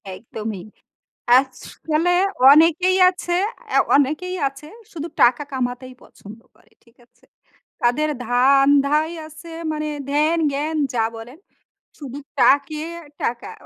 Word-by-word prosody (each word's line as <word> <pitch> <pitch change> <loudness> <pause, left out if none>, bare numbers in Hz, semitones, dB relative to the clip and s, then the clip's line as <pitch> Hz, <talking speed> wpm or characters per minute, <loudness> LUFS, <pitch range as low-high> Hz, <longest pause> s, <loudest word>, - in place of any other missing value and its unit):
একদমই। 215 -3 -7 0.7
আছ 265 0 +1 0.4
মানে 325 +3 +2 0.4
অনেকেই 335 +4 +4
আছে, 355 -1 -4 0.3
অ্যা - - +1 0.2
অনেকেই 310 +7 -1
আছে। 275 +2 -14 0.3
শুধু 325 0 -6
টাকা 245 +3 +4
কামাতেই 255 0 -4
পছন্দ 215 +3 -14 0.2
করে। - - -28
ঠিক 235 0 -27
আছে? - - -32 0.6
তাদের 255 +6 +1 0.2
ধান্ধাই 280 +5 +3
আছে 310 +2 -13 0.2
মানে, 305 0 -4 0.2
ধ্যান-জ্ঞান 305 0 0 0.2
যা 225 - +1
বলেন। 240 +6 -11 0.6
শুধু 275 -3 -8 0.2
টাকে 290 +2 +2 0.4
টাকা। 235 0 -3
280 Hz, 110 wpm, -20 LUFS, 245-310 Hz, 0.7 s, অনেকেই